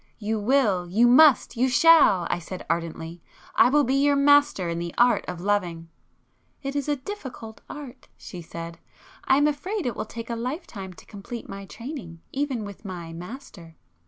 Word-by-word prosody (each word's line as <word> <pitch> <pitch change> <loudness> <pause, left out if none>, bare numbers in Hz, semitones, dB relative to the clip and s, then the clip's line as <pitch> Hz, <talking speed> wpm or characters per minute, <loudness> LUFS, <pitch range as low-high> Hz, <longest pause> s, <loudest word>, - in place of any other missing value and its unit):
"You 220 0 -2
will, 210 -6 +2
you 220 +7 +4
must, 265 +1 +6
you 255 +3 +2
shall!" 285 - +6
I 175 - 0
said 180 +2 -8
ardently. 165 0 -4 0.3
"I - - +5
will 295 +2 +4
be 260 - 0
your 285 +1 +3
master 285 -8 +4
in 170 0 -2
the 170 0 -5
art 240 0 +4
of 180 -1 -5
loving!" 175 -5 -1 0.7
"It 275 +1 -4
is 285 0 -2
a 295 - +2
difficult 260 - -8
art!" 270 -4 -10
she 180 - -9
said—"I 170 +10 -4
am 290 - +3
afraid 350 +7 -2
it 240 -4 -2
will - - -4
take 230 +2 -7
a - - -1
life 255 +9 -4
time 190 -3 -8
to - - -16
complete 215 +3 -8
my 195 0 -8
training, 230 - -8
even 270 -6 -2
with 200 +1 -10
my 175 -4 -7
'master. 175 - -10
230 Hz, 180 wpm, -25 LUFS, 180-280 Hz, 0.7 s, must